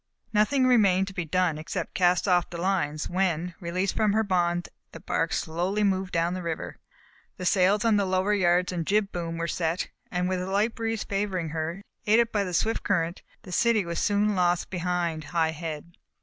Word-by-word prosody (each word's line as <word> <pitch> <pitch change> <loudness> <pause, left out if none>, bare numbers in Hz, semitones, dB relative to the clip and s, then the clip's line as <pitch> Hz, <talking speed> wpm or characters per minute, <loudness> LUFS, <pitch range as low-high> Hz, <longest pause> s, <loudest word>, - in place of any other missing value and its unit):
Nothing 255 +6 +3
remained 200 -7 +4
to - - -11
be 180 -3 -3
done 170 -1 +1
except 160 +2 -4
to - - -4
cast 180 +1 +3
off 180 -2 +3
the 170 - -6
lines, 170 -5 -1
when, 180 -2 -1
released 185 +1 -2
from 215 -2 +2
her 220 +1 +2
bonds 175 -3 0 0.3
the - - -8
bark - - -1
slowly 180 +6 -1
moved 190 -2 0
down 170 +1 +1
the 185 - -4
river. 165 -2 -5 0.6
The 180 - -5
sails 195 +3 +3
on 220 -2 +4
the 200 - +2
lower 185 +2 +1
yards 180 -2 +2
and 170 -3 -3
jib 205 0 +2
boom 165 -1 -4
were 165 0 -2
set, 170 +1 -1 0.2
and 180 0 -1
with 185 -1 -1
a 185 - -4
light 210 +4 +1
breeze 225 -1 -2
favoring 195 -4 -2
her, 165 +5 -4 0.2
aided 230 +2 +4
by 205 -2 +1
the 180 -2 -5
swift 225 +5 +1
current, 170 -2 -1 0.2
the 185 - -10
city 230 -2 +2
was 170 0 -3
soon 205 +1 +2
lost 175 -1 +1
behind 175 -3 -2
High 160 +1 +1
Head. 160 +1 -7
180 Hz, 200 wpm, -27 LUFS, 170-200 Hz, 0.6 s, remained